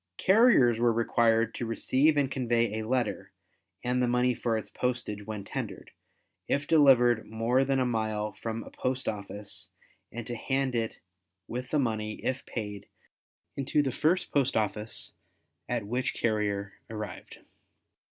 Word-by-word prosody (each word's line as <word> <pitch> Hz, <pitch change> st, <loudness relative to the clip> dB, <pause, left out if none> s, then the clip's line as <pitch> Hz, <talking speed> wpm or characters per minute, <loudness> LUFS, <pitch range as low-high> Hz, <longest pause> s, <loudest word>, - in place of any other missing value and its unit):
Carriers 190 Hz, -, +5 dB
were 120 Hz, 0 st, +4 dB
required 115 Hz, 0 st, +2 dB
to 120 Hz, -, -3 dB
receive 140 Hz, +6 st, +2 dB
and 140 Hz, -2 st, +2 dB
convey 120 Hz, -4 st, +1 dB
a 110 Hz, -, -4 dB
letter 125 Hz, -3 st, -1 dB, 0.5 s
(and 125 Hz, +1 st, +1 dB
the 125 Hz, -, +2 dB
money 125 Hz, +1 st, +2 dB
for 115 Hz, -1 st, -1 dB
its 110 Hz, -, -5 dB
postage 105 Hz, -2 st, -3 dB
when 105 Hz, -2 st, -4 dB
tendered) 110 Hz, -4 st, -6 dB, 0.6 s
if 140 Hz, 0 st, 0 dB
delivered 125 Hz, -7 st, +5 dB
more 115 Hz, +4 st, +2 dB
than 135 Hz, 0 st, +1 dB
a 130 Hz, -, +2 dB
mile 110 Hz, -3 st, -1 dB
from 110 Hz, +3 st, -5 dB
a -, -, -12 dB
post 130 Hz, +1 st, -2 dB
office 100 Hz, -1 st, -5 dB, 0.4 s
and 120 Hz, 0 st, -6 dB
to 120 Hz, -, -5 dB
hand 135 Hz, +2 st, -1 dB
it 115 Hz, -2 st, -1 dB, 0.5 s
with 125 Hz, +2 st, -5 dB
the 155 Hz, -, +1 dB
money, 110 Hz, -5 st, 0 dB
if 130 Hz, 0 st, -1 dB
paid, 105 Hz, -3 st, -5 dB, 0.7 s
into 140 Hz, +2 st, +1 dB
the 135 Hz, -, -1 dB
first 170 Hz, +8 st, +1 dB
post 140 Hz, -3 st, +2 dB
office 105 Hz, 0 st, -2 dB, 0.6 s
at 120 Hz, -4 st, -1 dB
which 125 Hz, +5 st, -1 dB
carrier 100 Hz, -3 st, -1 dB
arrived. 105 Hz, -2 st, -7 dB
120 Hz, 150 wpm, -29 LUFS, 110-130 Hz, 0.7 s, Carriers